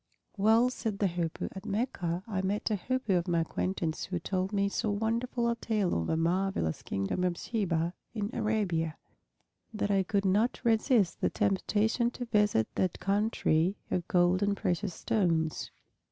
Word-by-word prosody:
"Well," 225 +4 +4
said 220 -5 -3
the 205 - +1
Hoopoe, 170 -2 -3
"at 190 - -8
Mecca 195 -5 -2
I 195 -4 -1
met 205 +4 -1
a - - +3
Hoopoe 220 -1 0
of 175 - -5
my 170 -2 +2
acquaintance 165 -1 -2
who 180 - -3
told 185 +3 -2
me 200 -1 +1
so 215 +2 -1
wonderful 230 +3 0
a 235 - +1
tale 215 -5 0
of 80 - -1
the 160 - +1
marvelous 175 - 0
Kingdom 100 - -2
of 180 -1 0
Sheba 175 -7 -1 0.2
in 210 0 -2
Arabia 200 -8 0 0.7
that 210 -2 -1
I 195 -1 +4
could 195 +1 0
not 210 +6 +2
resist 225 -4 +2
the - - +3
temptation 210 +4 +1
to 245 - -3
visit 210 - +2
that 185 -2 -1
country 195 -4 +1 0.2
of 175 -2 -1
gold 180 +1 +3
and 200 0 +1
precious 180 0 -1
stones. 165 -7 0
195 Hz, 165 wpm, -30 LUFS, 175-220 Hz, 0.7 s, Well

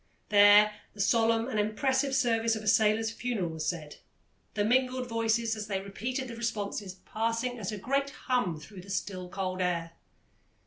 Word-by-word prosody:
There 205 +1 +7 0.2
the - - -15
solemn 225 +2 +2
and 220 -5 -1
impressive 265 +6 +1
service 230 -2 +2
of 215 - -6
a - - -7
sailor's 220 +2 +3
funeral 225 -7 -2
was 160 -1 -4
said, 155 -4 -4 0.6
the 205 -1 +1
mingled 255 +2 +1
voices 230 0 0
as 215 -1 -6
they 195 -2 -1
repeated 240 +7 -4
the 235 - -7
responses 205 -4 -3
passing 230 +2 -2
as 200 -2 -3
a 210 - -4
great 275 +7 0
hum 245 - -1
through 185 +4 -11
the 195 - -14
still, 185 -2 -4
cold 185 -1 -3
air. 170 -2 -1
215 Hz, 170 wpm, -29 LUFS, 195-235 Hz, 0.6 s, There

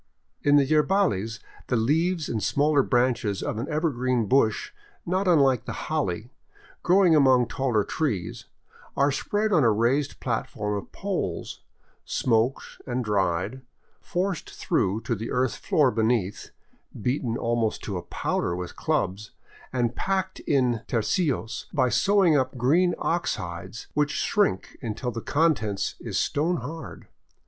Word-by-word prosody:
In 145 0 +4
the 145 -1 +5
yerbales 150 - +1 0.3
the 125 - +1
leaves 160 +8 +1
and 110 - -2
smaller 145 +7 +3
branches 120 -6 +1
of 110 - -3
an 120 - -4
evergreen 130 -7 0
bush 110 -1 +2 0.3
not 185 +2 0
unlike 140 -8 +4
the - - -4 0.2
holly, 115 - -1 0.5
growing 180 -2 +5
among 130 -4 +5
taller 125 -6 0
trees, 105 - -3 0.5
are 140 +1 +3
spread 210 +9 -1
on 155 -6 +4
a 115 - +5
raised 125 +7 +1
platform 105 -3 -2
of 100 - -6
poles, - - -4 0.4
smoked 115 +2 0
and 125 -1 -2
dried, 100 +3 0 0.4
forced 180 -1 -2
through 100 +4 -1
to 115 - -2
the 115 +1 -4
earth 125 0 0
floor 145 -5 +2
beneath, 110 -3 0 0.5
beaten 125 0 -1
almost 115 -2 -1
to 100 - -4
a - - -4
powder 85 0 -2
with 90 0 -6
clubs, 100 +4 -1 0.4
and 120 -2 0
packed 190 -1 -1
in 125 -5 +2
tercios 120 - -1
by 130 -5 +2
sewing 180 - +4
up 130 -2 0
green 165 +9 +3
ox 170 +1 0
hides, 90 +5 -7
which 150 -1 +1
shrink 200 - 0
until 120 +2 -3
the 115 0 -5
contents 135 -11 +1
is - - -4
stone 165 +5 +1
hard. 160 +6 -8
125 Hz, 140 wpm, -26 LUFS, 110-155 Hz, 0.5 s, the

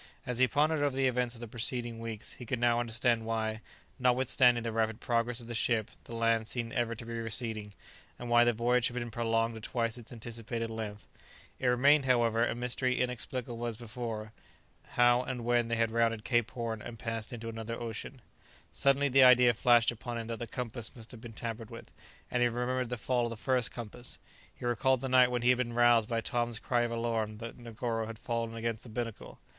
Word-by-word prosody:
As 125 -1 -1
he 130 - +6
pondered 150 +3 +2
over 145 -2 +1
the 135 0 +2
events 125 -1 0
of 115 - -12
the 120 - -6
preceding 120 0 -3
weeks 115 -2 -5
he 125 - -10
could 125 - -1
now 120 0 +3
understand 120 0 +1
why, 110 -1 -2 0.4
notwithstanding 125 -1 +5
the 115 - -2
rapid 110 0 0
progress 120 -1 0
of 120 - -10
the 120 - -6
ship, 115 -1 0
the 115 - -8
land 115 -1 +2
seemed 115 -1 -3
ever 115 -1 0
to 115 - -9
be 115 - -6
receding, 110 -2 -2 0.4
and 120 - -7
why 120 0 +6
the 120 - +4
voyage 120 +2 +2
had 120 - -7
been 120 -1 -3
prolonged 115 0 0
to 110 - -8
twice 115 +1 -2
its 115 - -12
anticipated 115 0 -5
length. 105 -2 -6 0.5
It 130 - 0
remained, 135 +4 +5
however, 115 -3 +3
a 120 - 0
mystery 125 +1 -1
inexplicable 125 -1 -3
as 115 -2 -4
before, 110 -2 -6 0.6
how 120 0 +5
and 125 -2 -5
when 120 -1 +2
they 115 - 0
had 115 -1 +1
rounded 115 -1 +1
Cape 120 -3 +2
Horn 115 -2 -4
and 115 - -8
passed 115 -1 -4
into 115 -2 -6
another 115 0 -5
ocean. 120 +2 -6 0.5
Suddenly 140 +1 +3
the 135 +1 +6
idea 125 -1 +7
flashed 120 0 +4
upon 120 +1 -6
him 115 - -4
that 115 0 -5
the 120 - -4
compass 120 0 -6
must 115 -2 -11
have 120 -3 -11
been 115 -1 -9
tampered 115 0 -5
with; - - -11 0.4
and 125 - +1
he 120 - +4
remembered 125 +1 -1
the 125 - -3
fall 120 +3 0
of - - -2
the 115 - -6
first 125 -1 +1
compass; 120 +1 -8 0.3
he - - -10
recalled 120 +2 +2
the 135 - -2
night 125 -1 +6
when 125 -1 -1
he 125 - +4
had 125 0 +4
been 120 -2 -1
roused 120 -2 +4
by 115 -1 0
Tom's 120 -1 -1
cry 120 +1 0
of 120 - 0
alarm 115 -2 -1
that 115 +2 -8
Negoro 115 -1 -3
had 115 -1 -7
fallen 115 0 -3
against 115 -1 -3
the 120 - -12
binnacle. 115 0 -5
120 Hz, 215 wpm, -31 LUFS, 115-125 Hz, 0.6 s, idea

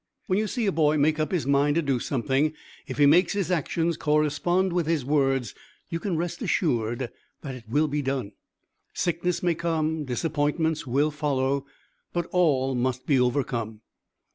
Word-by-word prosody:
When 190 -2 +1
you 215 - 0
see 235 +1 -2
a 200 - +2
boy 155 -2 +2
make 150 +2 +2
up 155 - -1
his 175 -7 0
mind 140 +1 +3
to 170 - +2
do 135 -3 0
something; 135 +5 0 0.3
if - - -6
he 145 - +5
makes 170 +5 +5
his 195 -3 -1
actions 165 0 0
correspond 155 +5 +1
with 175 -3 0
his 160 -6 0
words, 135 -5 +1 0.4
you 165 - -2
can 180 -2 -2
rest 170 +1 -3
assured 120 - 0 0.3
that 135 -3 -6
it 125 -3 -10
will 150 +6 +2
be 145 0 -1
done. 135 -6 -2 0.6
Sickness 175 0 -1
may 175 -1 +3
come; 160 -2 -1
disappointments 150 +3 -1
will 140 +5 +2
follow, 140 -2 -1 0.5
but 175 -1 -1
all 140 -7 +2
must 125 0 -1
be 140 -4 +3
overcome. 120 -4 -1
150 Hz, 170 wpm, -26 LUFS, 135-165 Hz, 0.6 s, he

